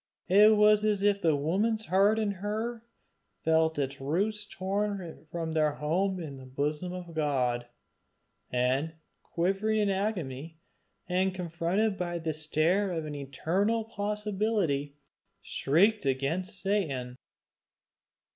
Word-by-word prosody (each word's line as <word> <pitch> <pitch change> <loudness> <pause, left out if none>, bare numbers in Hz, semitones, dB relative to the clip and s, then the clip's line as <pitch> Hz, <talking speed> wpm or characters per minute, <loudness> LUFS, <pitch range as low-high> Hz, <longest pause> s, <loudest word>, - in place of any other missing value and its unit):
It 210 +3 +7
was 210 0 +5
as 210 -2 +1
if 205 -1 +3
the 160 -3 +3
woman's 205 +10 0
heart 200 +3 +3
in 215 -2 +1
her 215 +4 -4 0.6
felt 160 0 +2
its 135 -1 -2
roots 205 +9 -1
torn 195 -4 -3
from 165 -1 -3
their 155 -2 +2
home 185 +6 0
in 150 -5 -6
the 130 -1 -11
bosom 150 +6 -2
of 180 -2 -7
God, 130 -6 0 0.8
and 130 +6 0 0.3
quivering 195 +5 0
in 205 -1 +2
agony, 165 -7 -3 0.5
and 185 +1 +1
confronted 180 +4 -1
by 175 -1 -2
the 165 -1 -2
stare 160 +6 +1
of 165 -3 -3
an 150 - -5
eternal 170 +11 -1
impossibility, 205 -8 -1 0.5
shrieked 190 +5 +2
against 165 +10 -1
Satan. 150 -12 -1
180 Hz, 120 wpm, -29 LUFS, 150-205 Hz, 0.8 s, It